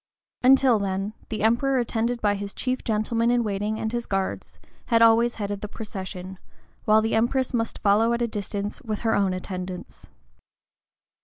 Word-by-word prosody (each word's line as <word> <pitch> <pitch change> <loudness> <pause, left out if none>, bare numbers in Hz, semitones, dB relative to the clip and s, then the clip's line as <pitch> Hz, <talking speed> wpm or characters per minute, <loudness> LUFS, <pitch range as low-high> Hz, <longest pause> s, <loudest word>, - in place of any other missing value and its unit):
[*115] 250 - +6
Until 250 -5 +3
then, 195 +1 -2 0.2
the 215 -2 -3
Emperor, 250 +5 +2
attended 235 0 -1
by 205 -1 +3
his 200 0 -6
chief 255 0 -2
gentlemen 230 +1 0
in 240 0 +3
waiting 210 +1 -2
and 220 +1 -3
his 240 0 -3
guards, 195 -1 -3 0.3
had 230 -2 +4
always 230 +1 +5
headed 205 -2 -4
the 210 - -4
procession, 190 -3 -7 0.5
while 215 -1 +5
the 225 - -1
Empress 245 +4 +1
must 230 -1 -1
follow 215 +3 +3
at 235 0 0
a - - +1
distance 205 -1 -4
with 215 -2 -4
her 225 -1 +1
own 200 -2 +2
attendants. 185 0 -6
220 Hz, 170 wpm, -25 LUFS, 200-235 Hz, 0.5 s, 115